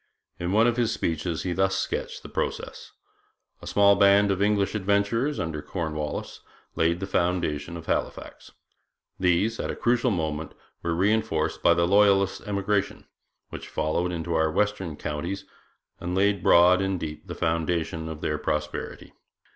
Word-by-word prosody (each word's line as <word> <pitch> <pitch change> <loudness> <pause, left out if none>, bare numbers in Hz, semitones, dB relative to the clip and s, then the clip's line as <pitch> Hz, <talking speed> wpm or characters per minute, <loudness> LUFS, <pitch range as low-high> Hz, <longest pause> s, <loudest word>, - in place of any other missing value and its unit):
In 85 +1 -2
one 110 +3 +4
of 120 0 +2
his 120 -2 +1
speeches 80 -1 -2
he 90 - -1
thus 95 +1 +1
sketched - - -3
the - - -8
process: - - -4 0.7
'A - - -10
small 100 0 +5
band 100 0 +5
of 95 0 -1
English 100 -1 +2
adventurers, 105 +7 0
under 80 -2 -3
Cornwallis, 75 -4 -4 0.4
laid 85 +1 +1
the 95 - -3
foundation 85 -4 -1
of 80 - -10
Halifax. - - -4 0.7
These, 95 +5 +1
at - - -3
a - - -3
critical 120 +1 +1
moment, 80 -5 -3 0.3
were 85 -1 -1
reinforced 95 -5 0
by - - +5
the 85 - +2
Loyalist 100 0 +3
emigration, 100 0 -1 0.4
which - - -8
flowed 80 +3 -1
into 85 0 -3
our 80 -1 +2
western 100 -3 -1
counties 75 +7 -4 0.5
and 90 +1 -3
laid 100 0 +2
broad 90 +2 +6
and 95 -1 -1
deep 75 -1 -7
the - - -6
foundation 80 0 -1
of 80 -1 -7
their 75 -1 -1
prosperity. 75 0 -4
90 Hz, 155 wpm, -26 LUFS, 80-100 Hz, 0.7 s, broad